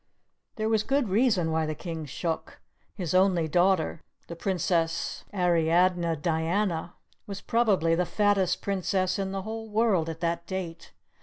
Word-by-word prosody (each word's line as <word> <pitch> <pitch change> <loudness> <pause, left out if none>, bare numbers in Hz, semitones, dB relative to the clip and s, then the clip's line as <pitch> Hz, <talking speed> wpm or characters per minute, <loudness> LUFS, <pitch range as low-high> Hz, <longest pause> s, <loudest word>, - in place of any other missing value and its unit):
There 220 -1 -1
was 220 -1 +2
good 270 0 0
reason 195 -6 +2
why 160 0 0
the 155 - -3
King 165 -1 -6
shook; 160 +4 -4 0.4
his 180 -5 -3
only 185 -3 +3
daughter, 175 0 +2 0.2
the 170 - -8
Princess 170 -2 -1
Ariadne 175 -1 +2
Diana, 165 +3 -1 0.3
was 200 -1 -6
probably 205 -8 +2
the 175 +1 +1
fattest 205 -3 +1
princess 190 -1 0
in 190 -1 -2
the 195 -1 -4
whole 225 +1 -6
world 210 -7 +2
at 165 0 -6
that 170 0 -2
date. 185 -3 -5
180 Hz, 145 wpm, -27 LUFS, 165-200 Hz, 0.4 s, only